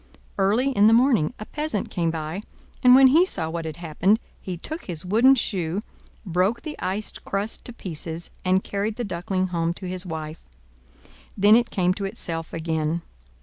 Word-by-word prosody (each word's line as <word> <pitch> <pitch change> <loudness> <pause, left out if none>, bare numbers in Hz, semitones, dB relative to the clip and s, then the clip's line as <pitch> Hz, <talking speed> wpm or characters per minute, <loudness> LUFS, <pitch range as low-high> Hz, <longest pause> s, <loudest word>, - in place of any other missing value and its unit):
Early 220 +8 +2
in 210 -4 +5
the 225 - +6
morning 240 - +2
a 215 - -7
peasant 300 -8 -3
came 170 -2 0
by, 160 +3 -4 0.4
and 250 0 +8
when 265 0 +8
he 320 +7 +6
saw 165 - -2
what 165 0 -4
had 160 -2 -5
happened, 175 +6 +1 0.2
he 185 -2 -5
took 315 - -6
his 170 -1 -4
wooden 235 +8 +5
shoe, 185 -7 -1 0.5
broke 185 +6 0
the 305 -2 -5
ice 200 +3 -2
crust 200 +3 -4
to - - -3
pieces, 165 -4 -6
and 185 +1 +2
carried 205 +2 -2
the 245 - -3
Duckling 185 -1 -2
home 170 -1 -1
to 185 - -7
his 180 0 -1
wife. 160 -3 -7 0.9
Then 205 +2 +6
it 240 0 +3
came 180 -1 +1
to 200 +1 -4
itself 170 -5 -4
again. 160 0 -2
185 Hz, 180 wpm, -24 LUFS, 165-220 Hz, 0.9 s, and